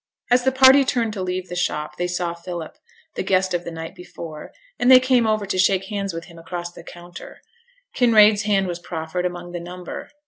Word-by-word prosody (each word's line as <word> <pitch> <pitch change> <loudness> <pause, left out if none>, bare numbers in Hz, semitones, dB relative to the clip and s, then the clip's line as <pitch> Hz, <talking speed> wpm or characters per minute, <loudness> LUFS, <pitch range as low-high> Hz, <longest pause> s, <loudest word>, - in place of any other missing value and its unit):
As 245 0 +4
the 265 - +4
party 265 +1 +7
turned 235 -4 -1
to 200 - -5
leave 185 0 -3
the 175 - -7
shop 150 -3 -2
they 175 - -1
saw 175 -1 -2
Philip, 170 -1 -7 0.4
the - - -3
guest 185 0 +1
of 175 0 -1
the - - -6
night 165 -1 -7
before; 165 -3 -10 0.3
and 245 - +3
they 260 -1 +10
came 255 -3 +2
over 215 -1 0
to 190 -1 -2
shake 190 0 +3
hands 200 -2 -3
with 165 0 -7
him 170 -1 -14
across 175 +1 -6
the 175 - -12
counter; 175 0 -12 0.5
Kinraid's 215 -4 +5
hand 205 -2 +1
was 175 -1 -4
proffered 175 +1 -3
among 175 0 -8
the 175 - -5
number. 180 +1 -8
180 Hz, 210 wpm, -22 LUFS, 175-210 Hz, 0.5 s, they